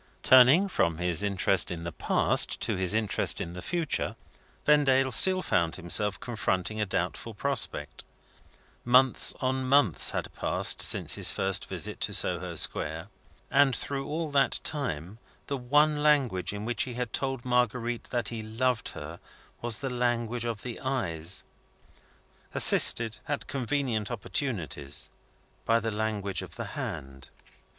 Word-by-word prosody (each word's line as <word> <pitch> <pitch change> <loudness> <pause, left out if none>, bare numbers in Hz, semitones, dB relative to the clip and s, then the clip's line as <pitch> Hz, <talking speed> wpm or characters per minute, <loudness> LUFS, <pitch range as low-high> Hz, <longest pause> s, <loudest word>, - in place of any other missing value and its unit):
Turning 130 +9 +6
from 85 - 0
his 90 +1 -2
interest 100 -1 +1
in 85 -1 -5
the 85 - -5
past - - 0
to - - -2
his 95 -1 -2
interest 110 -3 0
in 85 - -5
the 90 - -8
future, 170 - -2 0.5
Vendale 135 -3 +3
still 185 +9 +5
found 85 -3 0
himself 100 +3 +1
confronting 110 -3 -2
a 105 - -1
doubtful 95 +4 -3
prospect. 140 +6 -1 0.8
Months 125 +1 +4
on 130 0 -1
months 130 - +4
had - - -4
passed - - +1
since - - +3
his - - +2
first 95 0 0
visit - - -4
to - - -1
Soho 90 -1 0
Square - - 0 0.4
and 135 -2 +4
through 135 -1 -3
all 155 0 -3
that 140 -1 +2
time, 110 - -3 0.3
the 140 - -3
one 145 +4 +2
language 135 -11 +2
in 105 +1 -6
which 120 -2 -1
he 125 -2 -7
had 125 -2 -4
told 135 -2 -2
Marguerite 125 -1 -1
that 120 -3 -2
he 115 -2 -5
loved 115 +2 -1
her 80 +3 -8 0.4
was 120 -2 +2
the 135 - -4
language 120 -1 -1
of 115 -3 -4
the 120 -2 -6
eyes, 90 -11 -1 1.1
assisted, 115 -2 +5
at 145 -1 -3
convenient 125 -5 -2
opportunities, 100 - -4 0.5
by 115 0 +2
the 115 0 -3
language 105 -2 -2
of - - -10
the - - -5
hand. 65 0 -7
115 Hz, 145 wpm, -28 LUFS, 95-130 Hz, 1.1 s, Turning